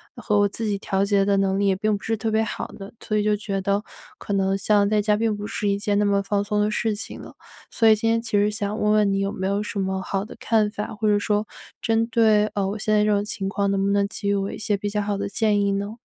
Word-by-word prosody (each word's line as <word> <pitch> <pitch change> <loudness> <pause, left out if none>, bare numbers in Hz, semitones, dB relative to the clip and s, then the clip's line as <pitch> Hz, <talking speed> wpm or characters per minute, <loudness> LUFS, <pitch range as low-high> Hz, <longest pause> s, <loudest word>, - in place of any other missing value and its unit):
然 - - -12
后 210 -2 +3
我 205 - +4
自 225 +3 -5
己 200 -2 -1
调 195 0 0
节 200 -1 +2
的 200 0 +2
能 195 0 +1
力 200 - +2
也 190 - +3
并 215 +2 0
不 200 - -8
是 225 -1 -1
特 220 +1 -2
别 220 +1 +2
好 220 - -4
的， 195 0 -10
所 215 - -3
以 210 - +2
就 210 0 +2
觉 195 -2 -3
得 200 +2 0 0.3
可 205 - -5
能 195 0 +1
像 205 0 +2
在 215 -1 +2
家 210 0 +2
并 220 -1 0
不 205 - -6
是 210 -1 -2
一 200 - +1
件 205 0 0
那 210 - +2
么 200 0 +2
放 200 0 0
松 210 0 -1
的 210 +1 +1
事 220 0 0
情 215 - -7
了。 - - -12 0.3
所 225 - +2
以 220 - +7
今 225 +2 -1
天 230 0 +2
其 230 -1 -8
实 205 0 +3
想 210 0 -3
问 210 0 +2
问 210 -2 +3
你 195 - 0
有 195 0 -1
没 190 - -4
有 200 +1 0
什 210 - -5
么 190 0 -1
好 195 +2 -2
的 - - -11
看 215 -2 +1
法， 210 0 -4
或 215 0 -1
者 205 0 +3
说 210 0 0 0.4
针 225 0 +1
对， 220 -2 +3
呃， 195 -1 0
我 210 +1 -4
现 215 - -1
在 210 0 +4
这 210 - +2
种 205 0 +2
情 200 -2 -4
况 200 0 0
能 195 0 0
不 200 - +1
能 200 0 +2
给 200 0 -4
予 - - +3
我 195 0 -2
一 - - -7
些 210 -1 0
比 205 +1 -3
较 210 0 -1
好 200 -1 -2
的 200 0 -3
建 210 -1 +1
议 200 0 +1
呢？ 200 +3 -4
205 Hz, 330 characters per minute, -23 LUFS, 200-215 Hz, 0.4 s, 以